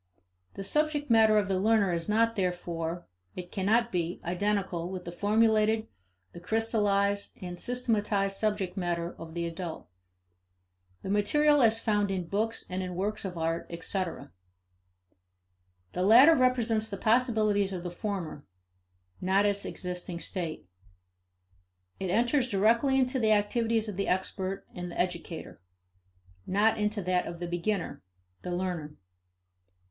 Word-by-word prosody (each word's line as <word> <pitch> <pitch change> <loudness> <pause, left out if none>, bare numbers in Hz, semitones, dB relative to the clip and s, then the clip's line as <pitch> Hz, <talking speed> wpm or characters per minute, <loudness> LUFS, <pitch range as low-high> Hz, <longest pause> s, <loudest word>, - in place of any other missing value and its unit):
The 195 - -5
subject 300 +3 0
matter 220 -1 +6
of 205 -2 +2
the 190 -1 0
learner 205 -2 +3
is 170 +3 -3
not, 230 +2 +2
therefore, 175 -3 -3 0.3
it 175 -1 -7
cannot 225 +4 +1
be, 175 -1 -2
identical 180 -1 -1
with 185 -1 -6
the 170 - -5
formulated, 220 +3 +2 0.5
the - - -10
crystallized, 200 0 0
and 175 -1 -7
systematized 210 -5 0
subject 205 -3 -1
matter 175 -2 -2
of 165 0 -9
the 170 0 -1
adult; 170 - -6 1.2
the - - -5
material 295 +9 +3
as 225 -1 +4
found 210 -3 +1
in 185 -2 -2
books 220 +6 -1
and 185 +1 -3
in 180 -1 -5
works 205 +4 -2
of 180 -2 -5
art, 165 +1 -2
etc. 170 - -3 1.6
The 180 - -2
latter 240 - +8
represents 240 -5 +2
the 200 - -5
possibilities 215 -4 +2
of 180 -2 -5
the 175 - -4
former; 175 -6 -4 0.8
not 190 +2 +3
its 200 -1 0
existing 180 -1 -5
state. 170 - -4 1.3
It 190 - -3
enters 245 +6 +2
directly 230 +6 +3
into 260 0 +1
the 220 -2 +4
activities 225 +2 +1
of 205 -3 -5
the 200 - -1
expert 190 +1 -2
and 180 0 -6
the - - -7
educator, 170 - -4 0.9
not 210 +3 +2
into 210 -1 -1
that 180 0 0
of 170 - -7
the 175 - -3
beginner, 175 +2 -2 0.4
the - - -6
learner. 175 -4 -3
200 Hz, 140 wpm, -29 LUFS, 180-220 Hz, 1.6 s, latter